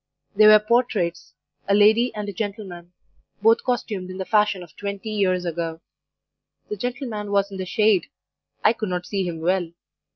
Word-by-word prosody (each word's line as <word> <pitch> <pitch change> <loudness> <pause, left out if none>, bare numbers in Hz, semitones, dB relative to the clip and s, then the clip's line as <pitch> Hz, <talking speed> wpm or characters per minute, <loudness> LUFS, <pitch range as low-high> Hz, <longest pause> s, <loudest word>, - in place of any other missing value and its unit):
They 215 +1 +7
were 215 0 +9
portraits 215 -5 -1 0.3
a 200 - +3
lady 220 +4 +4
and 210 -1 -4
a 205 - -5
gentleman, 190 -4 -6 0.5
both 225 +1 +5
costumed 210 -7 -3
in 185 - -7
the 190 - -4
fashion 210 -3 +1
of 170 - -16
twenty 200 +1 -5
years 185 -4 0
ago. 165 -1 -3 0.9
The 420 - -3
gentleman 240 - -4
was 200 0 +1
in 195 - -7
the 185 -1 -5
shade. 210 0 +2 0.6
I - - +5
could 215 -3 -4
not 180 0 -3
see 195 -3 -2
him 165 -2 -5
well. 175 0 0
200 Hz, 170 wpm, -23 LUFS, 180-215 Hz, 0.9 s, were